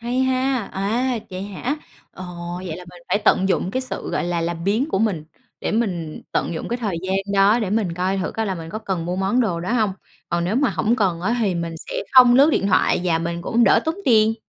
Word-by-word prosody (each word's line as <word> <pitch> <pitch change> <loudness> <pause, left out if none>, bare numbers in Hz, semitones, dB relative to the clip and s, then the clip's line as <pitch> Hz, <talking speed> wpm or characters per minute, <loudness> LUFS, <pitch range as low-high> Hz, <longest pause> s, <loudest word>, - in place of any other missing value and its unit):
hay 240 +2 -2
ha! 260 0 +1
À, 230 +6 0
vậy 185 +1 -5
hả? 205 +8 -3 0.4
Ồ, 185 - -8 0.4
vậy 160 - -4
là 180 - -10
mình 175 -1 -15
phải 205 - +2
tận 190 +1 +4
dụng 185 - 0
cái 260 - -1
sự, 255 - -4
gọi - - -1
là, 175 -1 -1
làm 165 0 -3
biếng 220 +9 +1
của 195 - 0
mình, 195 -8 0 0.4
để - - -2
mình 180 -9 -2
tận 170 - -1
dụng - - -5
cái 240 - -1
thời 210 -8 -2
gian 190 +1 0 0.2
đó 200 +4 +5
để 205 -5 -2
mình 205 -6 0
coi 185 +2 0
thử 185 - -2
coi 225 -1 -2
là 190 - -1
mình 165 -1 -8
có 215 - -4
cần 185 -6 -3
mua 180 +1 -2
món 195 +6 +1
đồ 180 -8 0
đó 185 +7 -2
hông. 215 -5 +2 0.4
Còn 170 0 0
nếu 205 +7 0
mà 275 -4 +2
hổng 210 +8 +1
cần 180 -5 +1
á, 230 +7 0
thì 200 -5 +1
mình 170 -1 -3
sẽ - - -9 0.2
không 250 -2 +8
lướt 280 +4 +6
điện 200 - +1
thoại 185 - +3
và 165 -2 +2
mình 170 +1 -3
cũng 235 +5 +2
đỡ 200 - +5
tốn 320 +1 0
tiền. 220 -2 +4
195 Hz, 255 wpm, -22 LUFS, 175-235 Hz, 0.4 s, không